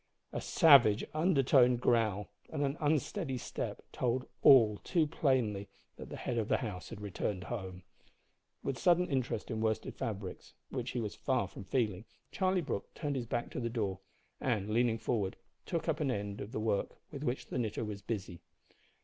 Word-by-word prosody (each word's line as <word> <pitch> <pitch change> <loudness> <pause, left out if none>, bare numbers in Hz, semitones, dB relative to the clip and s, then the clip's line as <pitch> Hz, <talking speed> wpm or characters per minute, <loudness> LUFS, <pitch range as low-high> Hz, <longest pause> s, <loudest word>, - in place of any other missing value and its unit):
A - - -2
savage 135 - +6
undertoned 135 -7 +4
growl 110 -5 +1 0.2
and 145 -2 -2
an 140 0 0
unsteady 150 0 0
step - - -5
told 125 +1 0 0.2
all 115 -6 +7
too 170 -4 +2
plainly 125 -10 0 0.3
that - - -9
the - - -6
head 120 - -2
of 110 - -1
the - - +3
house 105 -8 -5
had - - -8
returned 100 -1 -3
home. 95 -6 -6 0.8
With 130 -4 -2
sudden 180 +5 +4
interest 130 -6 -2
in 110 -1 -2
worsted 110 -1 0
fabrics, 100 -4 -5 0.2
which 125 -1 -3
he 125 - -2
was 105 -3 -3
far 130 -7 0
from 100 +1 -10
feeling, 105 -2 0 0.3
Charlie 185 -1 +1
Brooke 150 - -4
turned 145 -3 -2
his 125 -3 -3
back 120 +1 -2
to - - -4
the 115 -1 -1
door, 105 -5 -2 0.4
and, 105 -5 -1
leaning 115 0 +3
forward, 105 -4 -1 0.3
took 165 -2 -2
up 155 -2 +1
an 150 -3 +1
end 100 -4 -3
of 105 - -6
the - - -3
work 110 -2 -1
with 140 - -6
which 125 -2 -1
the - - -2
knitter 110 -1 -2
was 105 -1 -5
busy. 95 -5 -5
120 Hz, 180 wpm, -33 LUFS, 105-135 Hz, 0.8 s, all